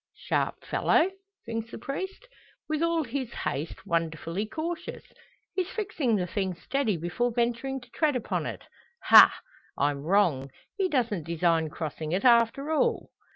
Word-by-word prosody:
"Sharp - - -2
fellow?" 360 +5 +2 0.3
thinks 225 0 -4
the - - -8
priest; 380 - -5 0.4
"with 310 0 -1
all 335 -1 +2
his 260 -1 -4
haste, 165 +6 -4
wonderfully 165 +3 -2
cautious! 320 +7 -5 0.5
He's 370 -1 -1
fixing 355 - -1
the 185 -3 0
thing 190 0 -2
steady 225 0 -1
before 175 +9 -1
venturing 240 +3 -1
to 245 - -16
tread 300 -4 +1
upon 250 - -2
it! - - -6 0.5
Ha! - - +10 0.5
I'm 140 0 0
wrong; 160 -6 +2 0.3
he 385 -3 0
don't 235 - 0
design 165 0 +1
crossing 155 0 -5
it 190 +5 0
after 240 +5 +4
all!" 315 - +1
230 Hz, 145 wpm, -28 LUFS, 170-280 Hz, 0.5 s, Ha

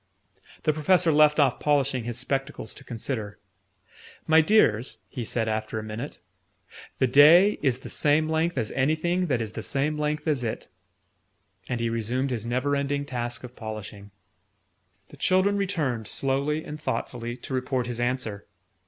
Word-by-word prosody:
The 155 - +2
Professor 165 +3 +3
left 150 0 +5
off 135 -4 +3
polishing 140 -4 +1
his 120 -1 -4
spectacles 135 -2 -3
to - - -13
consider. 110 -3 -4 0.9
"My 160 0 +6
dears," 140 - +3
he 125 - -5
said 115 0 -1
after 110 0 -2
a 110 - -3
minute, 110 +6 -6 0.8
"the - - +3
day 160 +10 +6
is 130 -3 +1
the - - -8
same 150 +1 +2
length 160 +1 0
as 115 -3 -1
anything 160 +6 +1
that 125 -6 0
is 110 - -6
the - - -6
same 150 +2 -1
length 150 +1 -2
as 145 -5 +1
it." 110 - -4 1.0
And 120 - -1
he 115 - 0
resumed 120 +4 -1
his 115 -2 -3
never 130 +4 0
ending 140 0 -1
task 120 -2 -4
of 125 0 -10
polishing. 105 -2 -8 1.0
The - - -14
children 190 +2 +2
returned, 155 - -1
slowly 140 +5 -1
and 150 +1 -8
thoughtfully, 120 -4 -3
to 130 - -8
report 130 -1 -1
his 120 -1 -4
answer. 120 -4 -2
135 Hz, 160 wpm, -26 LUFS, 120-150 Hz, 1.0 s, My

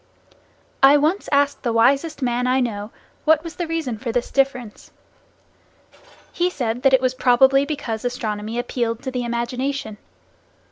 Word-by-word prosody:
I 275 +2 +7
once 315 +7 0
asked 285 0 +2
the 240 - -1
wisest 275 +6 +2
man 245 0 0
I 255 +1 +2
know, 210 -4 -3 0.3
what 315 0 +3
was 335 -2 -9
the 345 - -3
reason 315 -9 -3
for 235 0 -3
this 245 +1 -2
difference. 255 -5 -1 1.4
He 355 +1 +1
said 245 -7 -3
that 270 0 +3
it 260 - +1
was 255 -1 +1
probably 265 +2 +4
because 235 -7 -4
astronomy 225 -3 -3
appealed 240 -1 -2
to 260 - -4
the 250 -1 -3
imagination. 240 -1 -3
255 Hz, 150 wpm, -21 LUFS, 235-280 Hz, 1.4 s, I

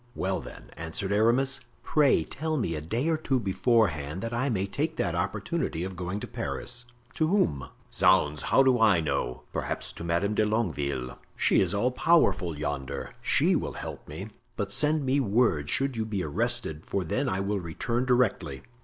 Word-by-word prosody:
"Well, 95 0 -1
then," - - -11
answered 80 +5 -4
Aramis, 120 +6 +3 0.2
"pray 145 - +3
tell 155 - -3
me 100 - -1
a 75 - -3
day 115 - -1
or 160 -1 +2
two 135 -4 0
beforehand, 95 - +1
that 115 0 -3
I 125 +4 0
may 100 -5 0
take 100 - -2
that - - -1
opportunity 80 - -2
of 95 0 -5
going 90 +3 -3
to - - -5
Paris." 120 +1 -4 0.3
"To 155 - +1
whom?" 75 - +1 0.2
"Zounds! 75 -1 +3
how 135 - +4
do 130 -2 +4
I 105 -6 +5
know? 60 -5 -2
perhaps - - -3
to - - -8
Madame 85 +5 0
de 110 - +2
Longueville. 75 - -1 0.2
She - - +3
is - - +1
all 120 +5 +2
powerful 125 - +2
yonder; 70 -2 -4
she - - +3
will - - -2
help - - -7
me. 95 +8 -7 0.3
But 100 -2 -2
send 150 +4 +1
me 135 +2 +2
word 105 - +2
should 135 - +2
you 110 -1 -2
be 100 -4 -2
arrested, 105 -2 -1
for 100 - -2
then 80 - -1
I 95 - -1
will 100 +1 -1
return 115 +9 -2
directly." 125 - +1
100 Hz, 180 wpm, -28 LUFS, 80-125 Hz, 0.3 s, I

